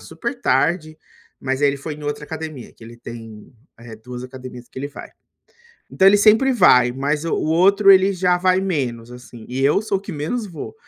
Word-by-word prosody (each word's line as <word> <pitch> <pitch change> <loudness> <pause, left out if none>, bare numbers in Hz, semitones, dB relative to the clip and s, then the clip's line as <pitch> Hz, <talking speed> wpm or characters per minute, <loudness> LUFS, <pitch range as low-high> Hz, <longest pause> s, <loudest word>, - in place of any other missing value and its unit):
supertarde, 155 +4 -2 0.4
mas 135 +1 -3
ele 140 0 +2
foi 150 +2 -7
em 150 - -13
outra 145 0 -4
academia, 155 -5 -8
que - - -20
ele 120 +1 -12
tem, 115 -2 -11 0.3
eh, 115 -1 -11
2 125 +2 -9
academias 125 -1 -11
que - - -10
ele 140 +2 -4
vai. 145 - -11 0.8
Então, 190 0 +5
ele 205 - +5
sempre 220 +6 +4
vai. 125 - +5
Mas 145 +4 -2
o - - 0
o - - -2
outro, 195 +5 +4
ele 190 +1 +4
já 180 0 +1
vai 185 0 +2
menos, 125 -11 -3
assim, 120 -2 -13
e 130 +2 -3
eu 150 +9 +2
sou 200 -3 -1
o - - -14
que 200 - -8
menos 170 +10 -3
vou, 170 - -9
145 Hz, 200 wpm, -20 LUFS, 125-185 Hz, 0.8 s, Então